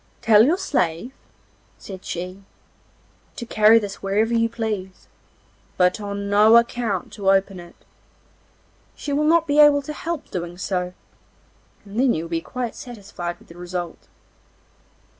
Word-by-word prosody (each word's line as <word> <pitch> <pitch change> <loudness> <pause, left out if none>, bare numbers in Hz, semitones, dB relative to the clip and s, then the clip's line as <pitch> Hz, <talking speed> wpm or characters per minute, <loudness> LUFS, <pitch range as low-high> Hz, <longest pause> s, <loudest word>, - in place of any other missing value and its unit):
'Tell 220 -1 +6
your 315 +9 +3
slave,' 180 - -1 0.7
said 190 -2 -10
he, 185 +3 -6 0.9
'to 235 - -6
carry 220 0 +5
this 205 -3 -3
wherever 210 +4 0
you 230 0 +2
please, 215 -5 -5 0.7
but 180 +3 +2
on 200 0 -4
no 210 +3 +6
account 235 -5 -1
to 195 -2 -1
open 195 -1 +2
it. 175 0 -13 1.2
She 285 - -5
will 300 +2 +1
not 330 +1 +4
be 295 -1 +1
able 290 -1 +6
to 300 - -6
help 325 0 -5
doing 175 -1 -5
so, 180 -1 -3 0.9
and 205 +3 -5
then 260 -1 +3
you 160 - -3
will 165 - -8
be 165 -1 -1
quite 245 +4 -5
satisfied 195 -7 -7
with - - -21
the 170 - -13
result. 175 -1 -6
205 Hz, 145 wpm, -22 LUFS, 185-240 Hz, 1.2 s, Tell